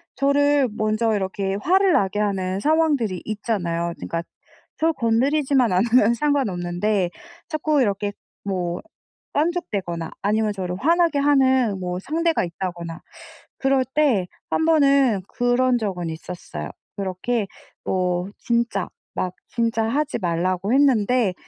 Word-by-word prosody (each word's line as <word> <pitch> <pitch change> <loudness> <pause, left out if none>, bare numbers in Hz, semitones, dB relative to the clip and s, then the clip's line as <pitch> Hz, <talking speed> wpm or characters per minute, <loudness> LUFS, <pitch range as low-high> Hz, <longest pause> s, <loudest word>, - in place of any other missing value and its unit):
저를 285 0 +3
먼저 215 +1 0
이렇게 195 0 -2
화를 380 - +4
나게 205 -6 +1
하는 190 -2 -1
상황들이 290 - +1
있잖아요. 175 -6 -2
그러니까 165 0 -3 0.6
저 325 +1 +2
건드리지만 265 -1 +2
않으면 230 +4 +4
상관없는데 205 -8 0 0.4
자꾸 310 -2 +1
이렇게 205 -2 0 0.3
뭐 180 -3 -2 0.5
깐죽대거나 205 - -1
아니면 215 +1 +1
저를 180 -2 -3
화나게 335 - +3
하는 260 -7 +3
뭐 180 0 -3
상대가 330 - 0
있다거나 170 -1 -5 0.6
그럴 270 -1 +2
때 260 -12 +3 0.2
1 320 - +1
번은 275 - +4
그런 245 +1 +2
적은 185 -6 -3
있었어요. 160 - -7 0.3
그렇게 200 +3 -2 0.4
뭐 180 0 -1
진짜 235 -5 0 0.3
막 180 -1 -2
진짜 230 -1 0
하지 285 +4 -1
말라고 180 +2 -1
했는데 250 -6 +3
220 Hz, 275 characters per minute, -23 LUFS, 185-275 Hz, 0.6 s, 화를